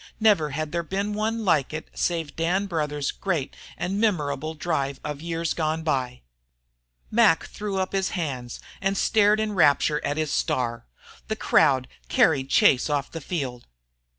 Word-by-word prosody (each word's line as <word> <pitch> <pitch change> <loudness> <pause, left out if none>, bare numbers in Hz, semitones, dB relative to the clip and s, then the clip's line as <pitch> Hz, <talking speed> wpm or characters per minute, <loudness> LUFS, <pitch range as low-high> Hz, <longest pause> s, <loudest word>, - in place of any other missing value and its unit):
Never 205 -9 +4
had 150 +2 -3
there 170 - 0
been 195 +5 -2
one 220 +1 -1
like 155 -6 +2
it 155 - -6
save 165 -4 -2
Dan 180 +5 0
Brouthers' 150 -5 -2
great 170 -9 -2 0.2
and 185 +4 -2
memorable 155 -7 0
drive 140 -4 -2
of 150 -1 -5
years 165 0 -2
gone 160 0 -1
by. 130 -5 -1 0.9
Mac 215 -7 +4
threw 205 -2 -5
up 190 0 -1
his 190 -1 +1
hands 130 -8 -4 0.2
and 195 +1 0
stared 215 -1 +3
in 215 -1 -1
rapture 150 -3 +3
at 145 - -1
his 155 -2 -1
star. 120 - -1 0.4
The - - -1
crowd 130 -2 +3 0.2
carried 135 -4 +3
Chase 130 +1 +4
off 145 -2 -1
the 165 - -6
field. 135 -7 -4
160 Hz, 155 wpm, -25 LUFS, 145-190 Hz, 0.9 s, Never